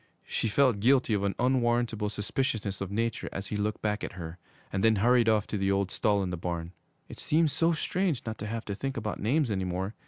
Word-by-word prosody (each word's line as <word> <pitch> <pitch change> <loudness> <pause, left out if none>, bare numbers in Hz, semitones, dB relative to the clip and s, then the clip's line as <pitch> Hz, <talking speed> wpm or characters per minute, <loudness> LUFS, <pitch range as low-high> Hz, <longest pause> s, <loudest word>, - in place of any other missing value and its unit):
She - - -1
felt 125 -1 +3
guilty 125 +1 +3
of 100 - +1
an 100 -1 0
unwarrantable 120 -4 +1
suspiciousness 105 -1 -2
of 100 - -3
nature 115 +2 -2
as 95 - -5
he - - -3
looked 105 +1 -2
back 105 -1 -1
at - - -4
her 85 -1 -7 0.3
and 95 - 0
then 110 -1 +5
hurried 120 +2 +4
off 110 -2 +3
to 105 - -3
the 95 0 +1
old 100 -1 0
stall 100 -2 +1
in 90 - -3
the 90 - -3
barn. 85 0 -4 0.4
It - - -10
seemed 155 0 +2
so 165 +3 +2
strange 170 -2 -1
not 110 -2 -5
to 105 - -4
have 115 +1 -4
to 100 - -3
think 135 +6 -4
about 105 -2 -3
names 130 +3 +1
any 95 -2 0
more. 95 +3 -2
105 Hz, 230 wpm, -29 LUFS, 100-120 Hz, 0.4 s, then